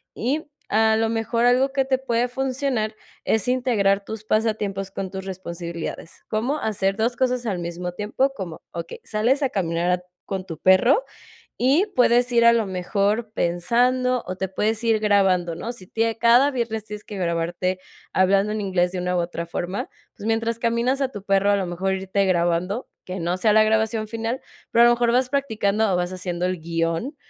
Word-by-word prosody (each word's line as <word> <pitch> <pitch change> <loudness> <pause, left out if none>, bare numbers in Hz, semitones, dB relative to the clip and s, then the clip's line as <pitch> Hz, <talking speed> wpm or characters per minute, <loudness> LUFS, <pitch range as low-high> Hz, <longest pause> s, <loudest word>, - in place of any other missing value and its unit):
y 280 +7 -1 0.3
a 220 0 +4
lo 225 0 +1
mejor 230 +1 0
algo 260 +3 +3
que 270 -1 +2
te 260 0 +1
puede 245 -2 0
funcionar 255 -4 -1 0.3
es 220 +2 +1
integrar 205 -6 +2
tus 220 0 -6
pasatiempos 210 -3 -1
con 190 -1 -5
tus 190 0 -6
responsabilidades, 170 -3 -6
¿cómo 245 +8 -1
hacer 195 -2 0
2, 235 +2 0
cosas 250 -1 0
al 190 -5 -1
mismo 175 +1 -4
tiempo? 210 +8 0
Como 180 -8 -7
okey, 170 -1 -7
sales 240 +7 +1
a 270 - +2
caminar 175 -3 0
a 180 0 0 0.2
con 190 -1 -4
tu 165 -4 -7
perro, 210 - +4 0.5
y 285 - +3
puedes 245 0 +3
ir 235 0 +4
a 235 - +8
lo 230 -2 +1
mejor 200 +4 -1
pensando, 245 +8 +1
o 185 - -3
te 190 0 -3
puedes 215 +4 -1
ir 225 -2 +3
grabando, 195 -5 +2
¿no? 225 +8 -5
Si 190 -7 -12
tiene 225 +2 -1
cada 240 +5 +5
viernes 230 -5 -3
tienes 210 0 -8
que 210 - -8
grabarte 175 +1 -1 0.3
hablando 195 +2 +3
en 215 - -2
inglés, 185 -3 +1
de 185 - -5
una 180 0 -1
u 175 - +2
otra 170 0 -4
forma, 175 +3 -4 0.3
pues 205 - -8
mientras 225 0 0
caminas 235 +3 0
a 270 -1 0
tu 205 -5 -8
perro, 195 0 +2
a - - +3
lo 195 -2 -1
mejor 185 +2 -1
irte 190 +1 0
grabando, 180 +4 0 0.2
que 185 0 -5
no 175 +2 -1
sea 215 +3 +3
la 215 +1 +6
grabación 220 0 +1
final, 230 +3 -3 0.3
pero, 235 - +6
a - - +8
lo 240 - +6
mejor 240 -1 +1
vas 250 +1 +2
practicando 220 -6 0
o 180 - +2
vas 180 +1 -1
haciendo 180 -1 -3
el 185 -1 -2
guion, 165 - -2
215 Hz, 195 wpm, -23 LUFS, 185-235 Hz, 0.5 s, a